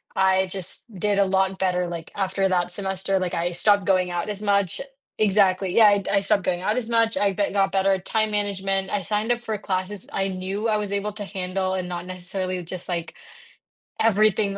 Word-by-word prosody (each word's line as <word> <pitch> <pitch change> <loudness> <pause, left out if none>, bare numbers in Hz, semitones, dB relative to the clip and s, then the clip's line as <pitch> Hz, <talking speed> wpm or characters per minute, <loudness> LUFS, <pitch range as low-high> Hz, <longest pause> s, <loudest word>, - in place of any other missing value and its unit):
I 190 0 +3
just 185 -1 -4
did 200 +2 0
a 200 - +5
lot 190 0 +1
better, 180 -2 +1
like, 170 -2 -7
after 195 0 0
that 175 -1 0
semester, 195 0 -2
like, 185 -1 -2
I 175 +1 -1
stopped 205 +2 +3
going 185 -2 +2
out 175 +3 -2
as 205 0 -4
much 200 -3 +1 0.4
exactly, 195 -3 +3
yeah, 220 -2 +8
I 200 -1 +3
I 200 - +4
stopped 200 -2 +1
going 180 -1 -1
out 210 +4 0
as 235 -2 -2
much, 230 -1 +2
I 200 -1 +2
be 200 +1 0
got 195 -1 +2
better 195 0 +3
at 190 -1 -3
time 215 -1 +1
management, 195 -2 -1
I 200 -2 -1
signed 215 +5 0
up 240 - +1
for 220 -2 -3
classes 190 0 -3
I 195 0 0
knew 190 +4 -3
I 215 - +2
was 205 -1 -3
able 200 +1 -2
to 210 -1 -6
handle 190 -1 -2
and 180 -1 -3
not 175 0 -5
necessarily 185 0 -4
just, 180 +2 -7
like, 170 -2 -3 0.9
everything 215 -2 +3
195 Hz, 210 wpm, -24 LUFS, 185-205 Hz, 0.9 s, yeah